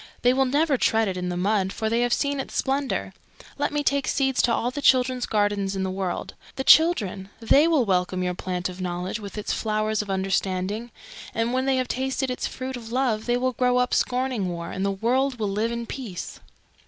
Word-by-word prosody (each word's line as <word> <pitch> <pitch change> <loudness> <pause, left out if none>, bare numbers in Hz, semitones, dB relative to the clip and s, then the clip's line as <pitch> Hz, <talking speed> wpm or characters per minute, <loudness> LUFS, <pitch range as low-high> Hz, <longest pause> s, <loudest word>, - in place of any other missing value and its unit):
They 245 +1 +5
will 265 +1 +3
never 285 +2 +2
tread 225 -2 +2
it 190 - -2
in 180 0 -3
the 175 - -3
mud, 195 0 +1
for 220 - -3
they 230 +2 +1
have 245 0 +1
seen 280 +2 0
its 270 - -5
splendour. 275 +1 -1 0.5
Let 290 - 0
me 295 0 -1
take 280 -1 +1
seeds 270 -2 +1
to 240 - +2
all 240 +1 0
the 290 - -5
children's 255 -2 +3
gardens 205 -2 0
in 190 - -1
the 190 - -2
world. 190 -1 -3 0.2
The 265 - -2
Children! 210 - +4
They 275 +7 +4
will 310 -7 +3
welcome 185 -1 0
your 180 0 -1
Plant 180 0 -3
of 185 0 -8
Knowledge 180 +3 -3
with 205 0 -8
its 210 - -2
Flowers 215 -1 0
of 210 - -9
Understanding, 195 +3 -1 0.5
and 230 +2 0
when 260 +1 +1
they 270 - +3
have 255 -1 0
tasted 265 +1 -1
its 250 - -2
Fruit 260 0 -5
of 230 -2 -9
Love 240 -4 0
they 240 0 +2
will 255 +1 0
grow 250 +1 +2
up 250 0 +1
scorning 250 -6 0
war, 170 -1 -5
and 190 - -3
the 200 - +1
world 245 +7 0
will 210 -3 -1
live 215 +4 -1
in 235 0 -3
peace." 225 -8 -6
230 Hz, 220 wpm, -25 LUFS, 195-260 Hz, 0.5 s, They